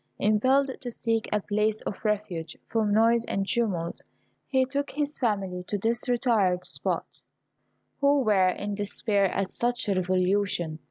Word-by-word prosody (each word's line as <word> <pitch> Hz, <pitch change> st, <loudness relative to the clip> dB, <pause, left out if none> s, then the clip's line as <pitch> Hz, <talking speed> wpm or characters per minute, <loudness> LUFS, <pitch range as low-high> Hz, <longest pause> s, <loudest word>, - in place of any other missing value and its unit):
Impelled 260 Hz, +7 st, +3 dB
to 245 Hz, -, -5 dB
seek 225 Hz, -1 st, -1 dB
a 210 Hz, -, +2 dB
place 210 Hz, +2 st, 0 dB
of 200 Hz, -, -6 dB
refuge 195 Hz, -7 st, -2 dB
from 220 Hz, -2 st, 0 dB
noise 230 Hz, +2 st, +4 dB
and 195 Hz, 0 st, -2 dB
tumult, 190 Hz, -9 st, -1 dB, 0.5 s
he 260 Hz, -1 st, +2 dB
took 280 Hz, +2 st, -2 dB
his 295 Hz, +1 st, -3 dB
family 195 Hz, -6 st, -1 dB
to 205 Hz, -, -1 dB
this 230 Hz, +4 st, 0 dB
retired 215 Hz, -8 st, +2 dB
spot, -, -, -3 dB, 0.8 s
who 280 Hz, 0 st, +4 dB
were 205 Hz, -6 st, +4 dB
in 205 Hz, +3 st, -2 dB
despair 205 Hz, 0 st, 0 dB
at 195 Hz, 0 st, -1 dB
such 240 Hz, 0 st, -1 dB
a 200 Hz, -, +2 dB
revolution. 185 Hz, -2 st, 0 dB
210 Hz, 150 wpm, -27 LUFS, 195-235 Hz, 0.8 s, noise